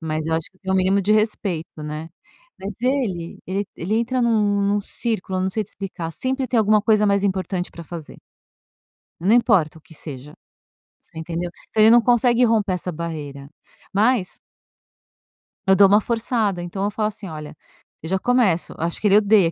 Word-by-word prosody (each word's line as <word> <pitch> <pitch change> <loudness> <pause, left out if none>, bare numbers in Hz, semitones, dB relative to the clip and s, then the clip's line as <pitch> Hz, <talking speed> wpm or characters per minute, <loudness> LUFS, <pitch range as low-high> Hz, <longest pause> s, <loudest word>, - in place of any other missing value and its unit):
Mas 155 -1 -3
eu 160 - 0
acho 160 0 -3
que 185 - -31
tem 190 -1 -3
o - - +2
mínimo 190 +1 +3
de 200 +2 +2
respeito, 195 -7 -1
né. 150 +1 -6 0.5
Mas 195 +2 -5
ele 235 -10 -1 0.4
ele 185 +6 -2
entra 245 +2 0
num 210 -3 +2
num 200 +1 +1
círculo, 200 -3 -3
eu - - 0
não 190 - 0
sei 215 +2 -2
te - - -14
explicar, 185 -4 -6
sempre 260 - -2
tem 245 - +1
alguma 215 0 +4
coisa 215 -1 +3
mais 200 0 +2
importante 185 -1 -1
para 170 - -9
fazer. 165 -2 -9 1.0
Não 190 +6 +3
importa 190 -10 +3
o 160 - -17
que 160 - -17
seja, 145 -2 -8 0.7
você 160 - -11
entendeu? 170 +2 -4 0.2
Então 215 - +1
ele 220 - +8
não 240 +1 +7
consegue 240 +1 +3
romper 215 -4 +1
essa 180 0 -3
barreira, 150 -4 -6 0.4
mas 210 -1 +1 1.3
eu 190 - +6
dou 200 0 +7
uma 205 +2 +5
forçada 225 -4 -1
então 175 +3 -4
eu 205 - 0
falo 215 0 -1
assim: 210 -1 -7
"Olha" 155 -3 -8 0.5
eu 160 - -4
já 190 +1 +1
começo 225 -8 +1
acho 165 +1 -2
que 215 - +2
ele 200 0 +6
odeia 205 -5 +4
195 Hz, 190 wpm, -22 LUFS, 170-215 Hz, 1.3 s, ele